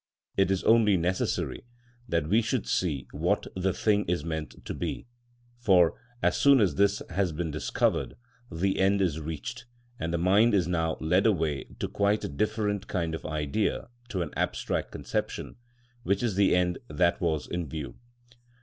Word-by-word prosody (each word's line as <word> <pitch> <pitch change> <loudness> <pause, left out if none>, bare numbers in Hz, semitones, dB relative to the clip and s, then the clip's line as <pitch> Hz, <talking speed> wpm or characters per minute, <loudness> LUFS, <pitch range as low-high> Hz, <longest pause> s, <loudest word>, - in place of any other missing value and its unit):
It 95 0 +3
is 95 -1 0
only 110 -4 +5
necessary 90 +2 -1 0.5
that 85 -5 +1
we 105 +7 +4
should 115 0 -1
see 75 -8 0
what 85 +7 0
the 95 +1 +1
thing 105 +2 +2
is 85 -3 -1
meant 80 -3 -5
to - - -4
be, - - -4 0.5
for, 95 -8 +5 0.3
as - - +3
soon 140 -1 +6
as 95 -8 +3
this 100 +5 +2
has 95 -3 +1
been 80 +1 -3
discovered, 75 0 0 0.4
the 95 +4 0
end 95 +1 +3
is 85 -5 +1
reached, 100 - -6 0.3
and 85 - -2
the 85 - 0
mind 100 +6 +4
is 90 -4 +2
now 80 -2 0
led 90 +7 +3
away 80 -9 0
to - - -2
quite 100 +1 +1
a - - -3
different 105 +5 -1
kind 85 -4 -2
of 80 - -5
idea 75 +10 -1 0.2
to 95 -6 -1
an 75 - -8
abstract - - -1
conception, - - -4 0.4
which 100 0 0
is 115 -4 +1
the 100 -1 +4
end 90 -1 +1
that 90 +2 +1
was 80 -6 0
in 85 -4 -4
view. 75 -2 -6
90 Hz, 170 wpm, -28 LUFS, 80-100 Hz, 0.5 s, soon